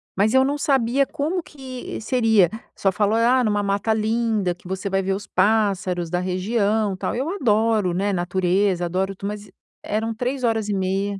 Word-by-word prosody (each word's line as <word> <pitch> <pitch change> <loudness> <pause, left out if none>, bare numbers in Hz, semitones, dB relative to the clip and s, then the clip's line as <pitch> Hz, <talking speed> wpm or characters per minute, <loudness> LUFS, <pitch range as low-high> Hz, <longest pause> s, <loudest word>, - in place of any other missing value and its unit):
mas 210 +4 +2
eu 265 0 +5
não 285 +2 -1
sabia 270 -2 +2
como 320 +7 -2
que 260 -5 -8
seria, 220 -5 +3 0.3
só 195 - +1
falou: 205 +3 +1
"Ah, 245 +3 +4
é - - +1
numa 210 -2 +1
mata 200 +2 0
linda, 220 -4 0
que 175 - -27
você 190 +2 -3
vai 195 0 +1
ver 195 0 -1
os 205 +1 -5
pássaros 190 -4 +1
da 180 +1 0
região, 200 +2 0
tal", - - -3
eu 265 +6 -2
adoro, 220 - +1
né, 200 +3 0
natureza, 180 +1 +1
adoro 190 +3 -1
tu 195 - -8
mas 210 0 -7 0.3
eram 220 +2 -2
3:30, 210 -6 -1
210 Hz, 170 wpm, -22 LUFS, 190-230 Hz, 0.3 s, eu